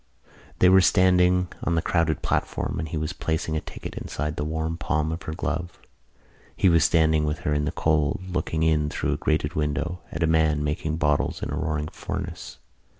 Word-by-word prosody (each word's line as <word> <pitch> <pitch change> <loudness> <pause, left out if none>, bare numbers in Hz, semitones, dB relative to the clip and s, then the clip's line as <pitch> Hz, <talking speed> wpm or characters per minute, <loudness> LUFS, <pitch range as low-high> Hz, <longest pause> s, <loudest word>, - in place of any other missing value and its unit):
They 90 - +5
were 95 +1 +7
standing 90 0 +4
on 85 - +1
the 80 - +2
crowded 85 -2 0
platform - - -1
and 80 - -3
he 80 - -3
was 75 0 -2
placing 80 0 -2
a 80 - -1
ticket - - -8
inside 75 +1 -4
the 75 - -2
warm 80 +1 -2
palm 80 -2 -1
of 80 +3 -4
her 80 - -5
glove. 85 0 -3 0.8
He 95 - +4
was 85 -3 +4
standing 80 -1 +3
with 75 +2 -2
her 75 - 0
in 75 0 0
the - - -1
cold, 75 0 +1
looking 80 -2 -1
in 75 -2 +2
through - - -1
a - - -2
grated 75 0 0
window 80 +2 -2
at - - -2
a - - +5
man 80 -2 +2
making 75 +1 -2
bottles 75 -3 0
in - - -3
a - - -2
roaring 75 -1 -2
furnace. - - -6
80 Hz, 200 wpm, -25 LUFS, 75-85 Hz, 0.8 s, were